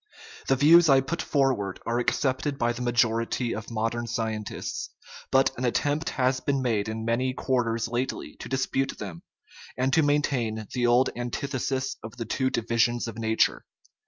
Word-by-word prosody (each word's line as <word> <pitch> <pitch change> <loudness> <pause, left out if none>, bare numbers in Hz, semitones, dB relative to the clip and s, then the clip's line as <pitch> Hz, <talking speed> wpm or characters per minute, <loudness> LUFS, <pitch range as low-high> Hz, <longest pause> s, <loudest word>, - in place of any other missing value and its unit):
The 135 - +4
views 160 +4 +6
I 135 -1 +7
put 165 +6 -3
forward 130 -9 0
are 120 +1 0
accepted 135 +3 0
by 120 -1 +1
the 120 - -7
majority 120 0 +1
of 110 +1 -6
modern 115 +1 -2
scien 110 -1 -2
tists, - - -5 0.4
but 135 0 +4
an - - -3
attempt 145 +5 0
has 130 0 +2
been 135 0 -1
made 110 -4 0
in 110 0 -4
many 125 +3 0
quarters 120 -4 0
lately 120 +3 -3
to - - -8
dispute 135 0 -1
them 90 -5 -7 0.6
and 130 +1 +1
to 160 - +5
maintain 135 -7 0
the 125 -2 +1
old 120 +2 +4
antith 120 +4 -4
esis 130 +1 -2
of 115 +3 -9
the 115 - -4
two 130 +4 0
divisions 115 0 +1
of 115 0 -7
nature. 110 0 +1
120 Hz, 170 wpm, -26 LUFS, 115-135 Hz, 0.6 s, I